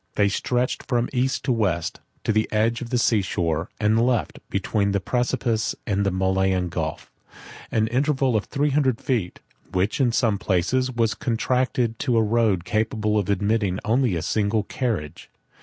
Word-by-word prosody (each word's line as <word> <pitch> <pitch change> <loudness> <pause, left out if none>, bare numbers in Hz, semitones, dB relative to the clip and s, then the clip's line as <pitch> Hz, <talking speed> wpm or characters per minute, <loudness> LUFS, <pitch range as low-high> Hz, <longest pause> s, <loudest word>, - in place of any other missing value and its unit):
They 100 -1 +3
stretched 125 +5 -1
from 120 -2 0
east 130 +1 0
to 130 - +1
west, 95 -8 0 0.2
to - - +1
the 110 +1 +1
edge 115 +2 +1
of 120 - -6
the 125 - +1
sea 115 -3 +3
shore; 85 -3 -1
and 110 +1 +3
left, 120 -2 0
between 100 +1 0
the 100 - +2
precipice 120 0 -1
and 100 -2 0
the 100 - +2
Malian 95 -1 +1
Gulf, 80 -2 -4 0.6
an 110 -1 +2
interval 135 -1 +1
of 105 - 0
three 145 +1 0
hundred 130 -4 +2
feet, 110 -9 -2 0.3
which, 95 +8 0
in 125 -3 +3
some 110 -3 +1
places, 105 +8 +1
was 115 -3 +1
contracted 120 0 0
to 125 -5 +1
a 110 - +4
road 105 -5 +1
capable 110 0 0
of 100 - -3
admitting 100 -1 +1
only 115 -2 +2
a 80 - -2
single 105 +4 +1
carriage. 100 - -3
110 Hz, 170 wpm, -24 LUFS, 100-125 Hz, 0.6 s, a